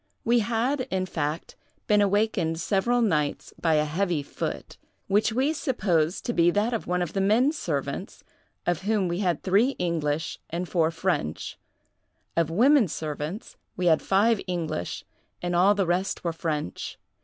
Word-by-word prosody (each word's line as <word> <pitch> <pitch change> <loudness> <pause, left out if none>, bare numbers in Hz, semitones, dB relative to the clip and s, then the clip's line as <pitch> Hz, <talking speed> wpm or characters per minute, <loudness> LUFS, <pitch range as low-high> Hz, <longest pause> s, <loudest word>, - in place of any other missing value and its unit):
We 240 +1 +3
had, 240 +5 0
in 185 -1 0
fact, 155 -2 -3 0.3
been 210 -1 +4
awakened 200 -5 +1
several 210 +8 +1
nights 150 -8 0
by 165 -2 +3
a 150 0 +3
heavy 170 0 -1
foot, - - -5 0.3
which 205 +3 +2
we 265 +7 +1
supposed 190 - 0
to 240 - -1
be 170 -3 +4
that 210 +6 +1
of 230 - -3
one 180 0 +1
of 170 - -5
the 195 - 0
men 225 +8 +4
servants, 320 - -4 0.4
of 175 -1 0
whom 205 -1 +1
we 175 +1 -2
had 180 -5 0
three 210 +8 +3
English 160 -3 -1
and 175 +2 -3
four 165 -2 +2
French; 165 - -2 0.8
of 165 -2 +2
women 245 - +5
servants 155 - -5 0.2
we 180 - -1
had 160 -2 +4
five 205 +2 +3
English, 165 - -3 0.3
and 175 0 -2
all 190 +4 +5
the 195 -2 +1
rest 180 +3 -1
were 170 -2 -1
French. 155 - -4
180 Hz, 160 wpm, -26 LUFS, 165-215 Hz, 0.8 s, women